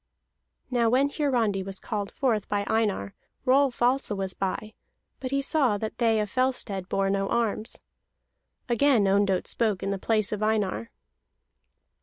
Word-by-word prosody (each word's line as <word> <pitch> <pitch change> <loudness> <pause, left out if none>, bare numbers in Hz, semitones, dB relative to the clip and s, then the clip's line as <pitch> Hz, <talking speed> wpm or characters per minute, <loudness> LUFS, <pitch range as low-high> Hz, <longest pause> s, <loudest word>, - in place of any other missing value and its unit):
Now 235 -2 +3
when 265 +4 +3
Hiarandi 240 -10 +1
was 195 0 -5
called 205 -3 -3
forth 230 -7 -1
by 205 -1 0
Einar, 205 - 0 0.3
Rolf 260 -2 +3
also 250 -3 +2
was 190 -1 -2
by, 195 +3 -3 0.5
but 260 - -4
he 275 +1 0
saw 270 -8 +2
that 215 +1 -5
they 225 -2 +3
of 210 - 0
Fellstead 225 -6 -1
bore 195 0 +1
no 195 0 0
arms. 230 -1 -1 0.9
Again 245 -1 +3
Ondott 195 -1 +2
spoke 215 -5 -1
in 195 - -1
the 195 - -2
place 215 0 +1
of 210 -1 -3
Einar. 210 - 0
215 Hz, 150 wpm, -26 LUFS, 195-250 Hz, 0.9 s, Now